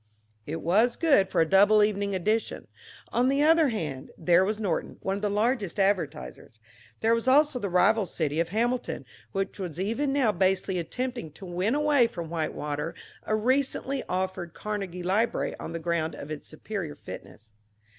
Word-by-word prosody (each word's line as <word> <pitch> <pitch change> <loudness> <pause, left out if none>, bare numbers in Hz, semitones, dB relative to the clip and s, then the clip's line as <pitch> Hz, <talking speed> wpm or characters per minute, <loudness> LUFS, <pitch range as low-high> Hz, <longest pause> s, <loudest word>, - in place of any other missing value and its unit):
It 160 +2 -4
was 215 +9 +3
good 275 - +3
for - - +2
a - - +4
double 205 +4 +6
evening 200 -1 0
edition. 215 +5 -1 0.4
On 245 +2 +2
the 275 +2 +2
other 320 -1 +5
hand, 150 - -4
there 175 +2 +4
was 210 +2 -1
Norton, 195 -7 -2
one 195 +1 -1
of - - -7
his 210 -1 0
largest 210 -3 0
advertisers. 180 - -1 0.4
There 225 +1 +3
was 230 +2 -1
also 285 0 +4
the 200 - -3
rival 195 +3 +3
city 155 -2 -1
of 165 - 0
Hamilton, 240 +5 -1 0.3
which 195 +1 -3
was 175 -4 -5
even 230 +9 0
now 270 -6 +3
basely 190 0 +1
attempting 240 +1 -4
to 190 - -10
win 185 +7 0
away 295 -5 +4
from 170 -7 -7
Whitewater 150 -1 -3 0.3
a 215 - +2
recently 265 +3 0
offered 185 -2 -3
Carnegie 195 -4 -4
library 205 +6 0
on - - -6
the 165 - -3
ground 165 -1 -1
of 145 - -8
its 150 - -6
superior 165 -1 -5
fitness. 105 -1 -11
195 Hz, 170 wpm, -27 LUFS, 170-230 Hz, 0.4 s, double